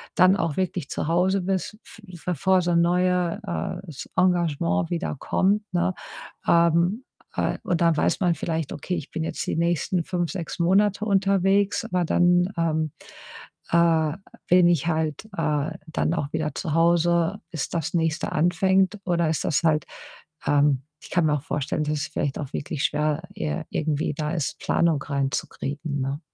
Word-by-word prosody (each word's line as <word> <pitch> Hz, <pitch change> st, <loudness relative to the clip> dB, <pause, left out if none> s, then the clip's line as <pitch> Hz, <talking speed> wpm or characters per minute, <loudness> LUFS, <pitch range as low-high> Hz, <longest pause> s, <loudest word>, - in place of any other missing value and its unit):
dann 185 Hz, +2 st, +5 dB
auch 165 Hz, -6 st, -1 dB
wirklich 185 Hz, -5 st, -1 dB
zu -, -, -2 dB
Hause 180 Hz, +3 st, +2 dB
bist, 190 Hz, +3 st, -2 dB
f -, -, -15 dB, 0.3 s
bevor 180 Hz, +2 st, +2 dB
so 175 Hz, 0 st, 0 dB
'n 170 Hz, -, +4 dB
neue, 180 Hz, 0 st, +1 dB
äh, 180 Hz, 0 st, -4 dB
s 145 Hz, -, -8 dB
Engagement 165 Hz, -, +1 dB
wieder 175 Hz, -2 st, -2 dB
kommt, 205 Hz, +3 st, +1 dB
ne? 175 Hz, +1 st, +1 dB, 0.5 s
Ähm, 170 Hz, +7 st, +3 dB, 0.3 s
äh, -, -, 0 dB
und 175 Hz, -3 st, -1 dB
dann 165 Hz, -2 st, +3 dB
weiß -, -, +1 dB
man 175 Hz, -3 st, +2 dB
vielleicht: 160 Hz, -3 st, -3 dB
„Okay, 180 Hz, -, -4 dB
ich 150 Hz, -, -6 dB
bin 160 Hz, -, -3 dB
jetzt -, -, -3 dB
die -, -, -1 dB
nächsten 170 Hz, +1 st, 0 dB
5, 175 Hz, -1 st, -2 dB
6 180 Hz, -4 st, -5 dB
Monate 200 Hz, +4 st, +3 dB
unterwegs, 195 Hz, 0 st, +2 dB
aber 180 Hz, -1 st, 0 dB
dann, 175 Hz, +2 st, +3 dB
ähm, 160 Hz, -2 st, 0 dB, 0.8 s
äh, 165 Hz, -2 st, +3 dB, 0.3 s
bin 180 Hz, 0 st, +6 dB
ich 170 Hz, -3 st, +2 dB
halt, 160 Hz, -2 st, -1 dB
äh, 150 Hz, -2 st, 0 dB, 0.2 s
dann 160 Hz, 0 st, -1 dB
auch 150 Hz, -4 st, -2 dB
wieder 155 Hz, -1 st, -1 dB
zu 160 Hz, -5 st, -3 dB
Hause, 170 Hz, +2 st, +3 dB
bis 160 Hz, -4 st, -3 dB
das 165 Hz, -2 st, -3 dB
Nächste 165 Hz, 0 st, 0 dB
anfängt.“ 190 Hz, +4 st, +2 dB
Oder 170 Hz, -2 st, +1 dB
ist 160 Hz, -, -1 dB
das 160 Hz, +1 st, +1 dB
halt 155 Hz, -2 st, +2 dB, 0.6 s
ähm, 145 Hz, -2 st, +3 dB, 0.2 s
ich -, -, -13 dB
kann 175 Hz, -3 st, +2 dB
mir 150 Hz, -, +2 dB
auch 145 Hz, -, -2 dB
vorstellen, 150 Hz, 0 st, -2 dB
dass 150 Hz, 0 st, -1 dB
es -, -, -2 dB
vielleicht 140 Hz, -, -2 dB
auch 140 Hz, -3 st, -6 dB
wirklich 145 Hz, 0 st, -3 dB
schwer 150 Hz, +1 st, 0 dB
ir 75 Hz, -1 st, -3 dB
irgendwie 155 Hz, -1 st, -1 dB
da 150 Hz, +1 st, -2 dB
ist, 155 Hz, -4 st, -2 dB
Planung 165 Hz, -4 st, +1 dB
reinzukriegen, 140 Hz, +1 st, -3 dB
ne? 135 Hz, +3 st, -2 dB
170 Hz, 170 wpm, -24 LUFS, 155-180 Hz, 0.8 s, bin